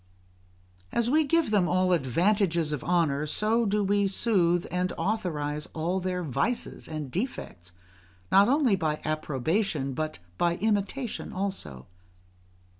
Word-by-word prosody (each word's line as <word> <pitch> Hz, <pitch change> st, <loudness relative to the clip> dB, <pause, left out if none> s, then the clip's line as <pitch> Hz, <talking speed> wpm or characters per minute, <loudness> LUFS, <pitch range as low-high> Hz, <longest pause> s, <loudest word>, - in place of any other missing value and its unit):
As 235 Hz, +1 st, +1 dB
we 310 Hz, +2 st, +4 dB
give 320 Hz, -3 st, +1 dB
them 195 Hz, -4 st, +3 dB
all 185 Hz, 0 st, +2 dB
advantages 170 Hz, -, +1 dB
of 150 Hz, -, -3 dB
honour, 155 Hz, -4 st, +1 dB
so 220 Hz, +7 st, +1 dB
do 205 Hz, +1 st, +1 dB
we 200 Hz, 0 st, +2 dB
soothe 180 Hz, -4 st, +2 dB
and 180 Hz, +1 st, 0 dB
authorise 150 Hz, -8 st, -2 dB
all 170 Hz, +4 st, -1 dB
their 180 Hz, -1 st, -2 dB
vices 155 Hz, -, -2 dB
and 155 Hz, -4 st, -5 dB
defects, 125 Hz, -, -5 dB, 0.6 s
not 200 Hz, +3 st, +6 dB
only 270 Hz, -6 st, +3 dB
by 155 Hz, -4 st, -1 dB
approbation, 155 Hz, -, -1 dB
but 155 Hz, +3 st, -3 dB, 0.2 s
by 170 Hz, 0 st, +2 dB
imitation 215 Hz, +4 st, -2 dB
also. 185 Hz, -, -4 dB
180 Hz, 125 wpm, -27 LUFS, 155-210 Hz, 0.6 s, not